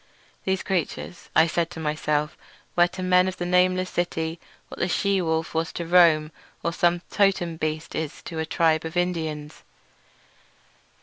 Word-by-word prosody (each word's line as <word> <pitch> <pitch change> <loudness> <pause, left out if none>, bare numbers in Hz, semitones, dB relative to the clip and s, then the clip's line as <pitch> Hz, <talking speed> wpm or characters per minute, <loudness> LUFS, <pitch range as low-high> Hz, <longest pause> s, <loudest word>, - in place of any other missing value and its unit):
These 190 0 0
creatures, 180 -1 -3
I 160 - +7
said 165 0 0
to 175 - -9
myself, 150 -1 -1 0.4
were 175 0 +5
to 185 +1 -7
the - - -2
men 180 0 +5
of 185 - -4
the 175 - -3
nameless 185 +1 +2
city 165 -1 -2 0.3
what - - -10
the - - +1
she 195 +1 +1
wolf 160 -1 -1
was 165 0 -1
to 170 - -4
Rome, 165 -3 +5 0.3
or 170 - -1
some 175 0 +2
totem 190 -5 +2
beast 155 0 -3
is 155 -2 -4
to 165 - -6
a 160 - -1
tribe 160 -2 +2
of 160 +2 -5
Indians. 160 -4 -2
170 Hz, 170 wpm, -25 LUFS, 160-180 Hz, 0.4 s, I